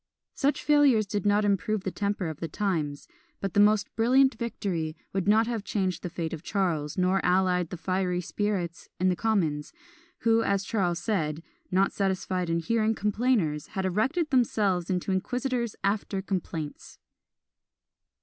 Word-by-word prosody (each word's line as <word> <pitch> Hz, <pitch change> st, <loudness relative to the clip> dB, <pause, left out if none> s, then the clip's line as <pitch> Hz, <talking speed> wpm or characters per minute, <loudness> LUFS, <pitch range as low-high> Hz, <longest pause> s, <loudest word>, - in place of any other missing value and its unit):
Such 280 Hz, +2 st, 0 dB
failures 285 Hz, -7 st, +4 dB
did 205 Hz, 0 st, -2 dB
not 205 Hz, +1 st, +3 dB
improve 205 Hz, 0 st, 0 dB
the 190 Hz, -, -2 dB
temper 200 Hz, -2 st, -2 dB
of 160 Hz, -1 st, -6 dB
the 165 Hz, -, -3 dB
times; 155 Hz, -5 st, -2 dB, 0.3 s
but 195 Hz, -3 st, -3 dB
the -, -, +3 dB
most 210 Hz, 0 st, +3 dB
brilliant 260 Hz, +4 st, +4 dB
victory 175 Hz, -9 st, -3 dB, 0.2 s
would 195 Hz, 0 st, -1 dB
not 220 Hz, +2 st, +5 dB
have 230 Hz, -3 st, -3 dB
changed 190 Hz, -5 st, -1 dB
the 180 Hz, -, -4 dB
fate 165 Hz, -1 st, -4 dB
of 160 Hz, -, -5 dB
Charles, 165 Hz, -7 st, -1 dB
nor 185 Hz, +1 st, +2 dB
allayed 180 Hz, -1 st, +2 dB
the 180 Hz, -, -6 dB
fiery 185 Hz, 0 st, -1 dB
spirits 180 Hz, -2 st, -3 dB
in 185 Hz, +1 st, +3 dB
the 180 Hz, -, +2 dB
commons, 170 Hz, -9 st, 0 dB, 0.5 s
who, 230 Hz, 0 st, +4 dB
as 200 Hz, -3 st, +1 dB
Charles 180 Hz, -6 st, 0 dB
said, 165 Hz, -6 st, -1 dB, 0.3 s
"not 190 Hz, +2 st, +2 dB
satisfied 185 Hz, -2 st, -1 dB
in 165 Hz, -, +1 dB
hearing 220 Hz, +4 st, +1 dB
complainers, 210 Hz, -, 0 dB
had 190 Hz, -, 0 dB
erected 265 Hz, -, 0 dB
themselves 205 Hz, -8 st, +2 dB
into 185 Hz, +1 st, -1 dB
inquisitors 245 Hz, +4 st, -1 dB
after 200 Hz, 0 st, 0 dB
complaints." 165 Hz, -6 st, -5 dB
195 Hz, 155 wpm, -27 LUFS, 180-215 Hz, 0.5 s, not